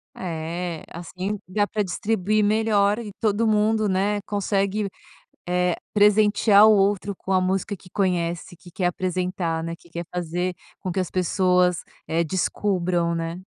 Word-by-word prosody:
É, 170 Hz, -1 st, -4 dB
assim 185 Hz, +4 st, -5 dB
dá 205 Hz, +3 st, +1 dB
para 210 Hz, 0 st, -1 dB
distribuir 210 Hz, +2 st, 0 dB
melhor 210 Hz, 0 st, +2 dB
e 210 Hz, -4 st, -7 dB
todo 220 Hz, +1 st, +1 dB
mundo, 215 Hz, 0 st, +2 dB
né, 200 Hz, +2 st, +1 dB
consegue, 200 Hz, 0 st, -1 dB, 0.6 s
eh, 180 Hz, 0 st, +1 dB, 0.2 s
presentear 210 Hz, 0 st, +5 dB
o -, -, +7 dB
outro 200 Hz, 0 st, +1 dB
com 190 Hz, -, -6 dB
a 190 Hz, -, +4 dB
música 190 Hz, +2 st, -1 dB
que 180 Hz, 0 st, -18 dB
conhece, 175 Hz, -3 st, -1 dB
que 175 Hz, -, -15 dB
quer 180 Hz, +1 st, 0 dB
apresentar, 180 Hz, -2 st, -2 dB
né, 165 Hz, 0 st, -4 dB
que -, -, -21 dB
quer 170 Hz, 0 st, -5 dB
fazer 180 Hz, +1 st, -2 dB, 0.2 s
com 185 Hz, -, -4 dB
que 190 Hz, -, -1 dB
as 185 Hz, -, -2 dB
pessoas, 180 Hz, -1 st, +2 dB, 0.3 s
eh, 165 Hz, +1 st, +1 dB
descubram, 175 Hz, 0 st, 0 dB
né. 165 Hz, +1 st, -3 dB
185 Hz, 150 wpm, -24 LUFS, 175-205 Hz, 0.6 s, o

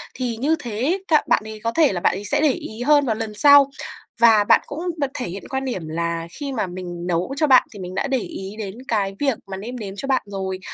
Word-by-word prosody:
thì 245 Hz, -3 st, -2 dB
như 300 Hz, +7 st, +2 dB
thế 235 Hz, -, -6 dB
ấy 370 Hz, +7 st, 0 dB, 0.2 s
k -, -, -26 dB
bạn -, -, +3 dB
ấy 220 Hz, 0 st, -8 dB
có 230 Hz, -, 0 dB
thể 305 Hz, -8 st, +3 dB
là 175 Hz, -, -3 dB
bạn -, -, +2 dB
ấy 205 Hz, -, -7 dB
sẽ 205 Hz, -, +2 dB
để 305 Hz, -, +4 dB
ý 225 Hz, -2 st, -7 dB
hơn 290 Hz, 0 st, +4 dB
vào 225 Hz, -, 0 dB
lần 220 Hz, -1 st, -4 dB
sau. 285 Hz, +4 st, +7 dB, 0.5 s
Và 225 Hz, -3 st, +6 dB
bạn -, -, +5 dB
cũng 290 Hz, -, -6 dB, 0.2 s
bật 275 Hz, -2 st, -1 dB
thể 255 Hz, -7 st, -4 dB
hiện 190 Hz, +3 st, -7 dB
quan 265 Hz, 0 st, -2 dB
điểm 185 Hz, -11 st, -4 dB
là 170 Hz, +1 st, -2 dB
khi 280 Hz, +8 st, -5 dB
mà 215 Hz, -6 st, -1 dB
mình 175 Hz, -1 st, -7 dB
nấu 180 Hz, +9 st, -1 dB
cho 305 Hz, -1 st, +2 dB
bạn 255 Hz, -2 st, +6 dB
thì 205 Hz, -, -10 dB
mình 185 Hz, 0 st, -7 dB
đã 275 Hz, -, -1 dB
để 270 Hz, -1 st, +1 dB
ý 195 Hz, -1 st, -7 dB
đến 195 Hz, -2 st, -5 dB
cái 195 Hz, -3 st, -1 dB
việc 270 Hz, -6 st, +1 dB
mà 190 Hz, -1 st, -6 dB
nêm 235 Hz, +6 st, -7 dB
nếm 195 Hz, -2 st, -6 dB
cho 275 Hz, -, -5 dB
bạn 265 Hz, -1 st, +2 dB
rồi, 190 Hz, -2 st, -4 dB
220 Hz, 270 wpm, -22 LUFS, 190-270 Hz, 0.5 s, sau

